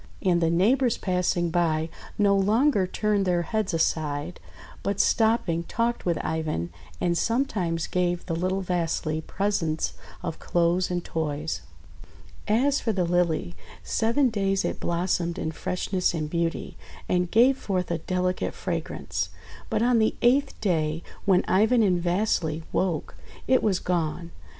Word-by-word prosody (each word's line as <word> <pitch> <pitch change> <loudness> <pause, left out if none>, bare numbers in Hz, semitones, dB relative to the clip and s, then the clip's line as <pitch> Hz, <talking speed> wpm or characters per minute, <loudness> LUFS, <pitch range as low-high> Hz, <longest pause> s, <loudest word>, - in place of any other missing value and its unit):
And 175 -3 +3
the 165 - +3
neighbours 230 +9 +3
passing 180 -2 0
by 160 -2 +1 0.3
no 200 -1 +4
longer 210 +2 +3
turned 210 +1 0
their 175 -2 +1
heads 215 +2 -1
aside, 155 -1 -1 0.4
but 200 0 -2
stopping 220 -7 +2
talked 230 0 -1
with 170 - +2
Ivan, 155 - -2 0.3
and 175 -1 +1
sometimes 185 -8 0
gave 175 -1 -1
the 165 - -2
little 185 +3 -1
Vasily 165 -3 -1
presents 170 -4 -1 0.3
of 165 -3 -4
clothes 175 +1 +1
and 175 -1 -2
toys. 155 -1 -3 0.9
As 265 +7 +3
for 225 - -1
the 190 -3 0
Lily, 170 - 0 0.3
seven 235 - +2
days 195 -3 0
it - - -2
blossomed 170 0 -1
in 160 - -2
freshness 180 +2 -1
and 155 -2 -2
beauty, 170 +1 -2 0.3
and 180 -1 +1
gave 245 +7 +5
forth 185 -8 -2
a 170 - -1
delicate 180 +2 -1
fragrance; - - -3 0.4
but - - +1
on 240 -1 +4
the 220 - +2
eighth 270 +4 +3
day, 160 -5 0 0.2
when 190 -2 +4
Ivan 220 +4 +4
and 180 -4 +2
Vasily 175 -3 0
woke, 175 -5 -1 0.3
it 260 +1 +4
was 200 -4 +2
gone. 170 -1 -2
180 Hz, 140 wpm, -26 LUFS, 165-210 Hz, 0.9 s, gave